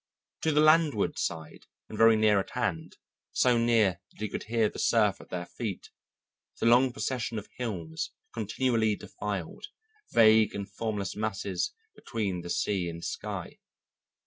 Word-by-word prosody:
To 160 - +2
the 150 0 +4
landward 155 -7 +3
side 80 -2 -4 0.2
and - - -8
very 115 +1 +6
near 110 -2 +4
at 95 - -4
hand, 85 -10 -2 0.4
so 125 -1 +4
near 110 -6 +3
that - - -24
he 105 - -2
could - - -5
hear 115 -1 +2
the - - -7
surf 105 -4 +2
at - - -15
their 90 -1 -4
feet, 105 +1 -6 0.7
the - - -1
long 125 +2 +5
procession 120 -2 -3
of 105 - -6
hills 85 -10 -4 0.2
continually 110 0 +1
defiled, 100 - -6 0.4
vague 110 -1 +5
and 100 -1 -4
formless 105 -1 -3
masses 100 -3 -2 0.2
between 100 -6 -3
the 85 - -8
sea 95 -1 0
and 85 0 -7
sky. - - -5
110 Hz, 150 wpm, -29 LUFS, 95-115 Hz, 0.7 s, very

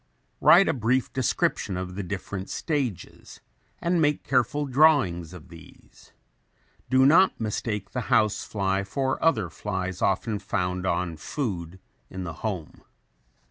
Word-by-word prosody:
Write 180 +4 +7
a - - +2
brief 125 +1 0
description 110 -6 0
of 90 0 -5
the 100 - -4
different 95 0 -5
stages 135 - -4 0.4
and 170 -1 0
make 150 -1 +1
careful 135 +3 +1
drawings 130 - +3
of 90 -4 -12
these. 85 -1 -16 0.8
Do 130 0 +5
not 175 +7 +5
mistake 105 -2 -3
the 125 - -2
house 105 -1 +2
fly 100 -1 -1
for 130 +6 -2
other 110 - +2
flies 95 -1 -4
often 100 +2 0
found 90 -1 -2
on 85 -2 -1
food 95 - -4 0.3
in 95 0 -6
the 85 -2 -5
home. 95 -8 -5
100 Hz, 135 wpm, -26 LUFS, 90-130 Hz, 0.8 s, Write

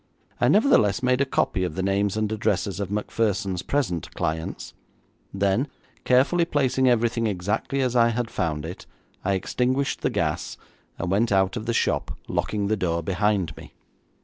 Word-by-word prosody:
I - - +3
nevertheless 130 - +4
made 125 +1 +2
a - - +3
copy 95 -7 0
of 90 -4 -3
the 95 - -2
names 100 +1 +1
and 110 -1 0
addresses 100 -3 -1
of 100 -2 -3
Macpherson's 100 -3 -1
present 100 - -1
clients; 80 +1 -3 0.6
then, 100 +7 +1 0.4
carefully 135 +8 +4
placing 130 -5 +2
everything 120 -1 +2
exactly 105 +8 -1
as 125 -1 0
I 115 -1 +5
had 115 0 -2
found 75 -2 -2
it, 85 +3 -8 0.4
I 100 - +1
extinguished 130 +8 0
the - - +1
gas, - - -2 0.4
and 90 - -3
went 110 +4 +2
out 95 -1 +2
of 110 -1 -5
the - - +2
shop, - - 0
locking 105 -1 -1
the 110 +2 +1
door 85 -4 -1
behind 95 +1 0
me. - - -12
105 Hz, 165 wpm, -25 LUFS, 95-125 Hz, 0.6 s, I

